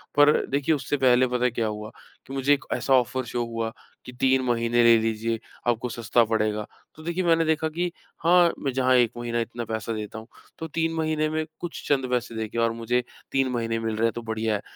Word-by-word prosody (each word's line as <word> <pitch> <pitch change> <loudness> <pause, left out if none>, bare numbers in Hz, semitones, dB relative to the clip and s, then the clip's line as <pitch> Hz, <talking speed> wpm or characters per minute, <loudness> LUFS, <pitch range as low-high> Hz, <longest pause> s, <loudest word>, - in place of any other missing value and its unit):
पर 145 +1 +5
देखिए, 145 +3 +1
उससे 145 +1 -2
पहले 130 -1 +4
पता 125 0 -1
है, 125 - +2
क्या 115 -1 -1
हुआ? 105 +1 -5 0.4
कि 135 - -8
मुझे 135 +2 +3
एक 145 - -2
ऐसा 135 - +1
ऑफ़र 130 +1 +2
शो 120 0 -2
हुआ 115 -1 -3 0.3
कि, 125 - -8
"3 130 +1 +2
महीने 120 0 +2
ले 115 -1 +7
लीजिए, 115 0 -1 0.3
आपको 120 +1 0
सस्ता 115 +1 +2
पड़ेगा।" 105 -1 0 0.3
तो 155 - -12
देखिए, 170 +2 -1
मैंने 165 -1 +3
देखा 160 0 +1
कि 175 +2 -2 0.3
हाँ, 175 0 +5
मैं 135 - -1
जहाँ 130 -1 +3
1 120 -2 +4
महीना 120 0 -2
इतना 115 0 -4
पैसा 110 0 -3
देता 110 +1 -5
हूँ, 110 - -13 0.3
तो 160 - -4
3 165 +1 -1
महीने 155 -1 0
में 155 0 -1
कुछ 175 -2 -6
चंद 135 -3 +2
पैसे 120 -2 -1
देके 110 +1 -4
और 115 0 +2
मुझे 120 +2 -1 0.3
3 135 -1 +2
महीने 115 -1 -1
मिल 110 -1 -2
रहे 110 - +1
हैं, 115 - +1
तो 120 - -5
बढ़िया 110 -1 -1
है। 105 - -3
120 Hz, 225 wpm, -25 LUFS, 115-145 Hz, 0.4 s, ले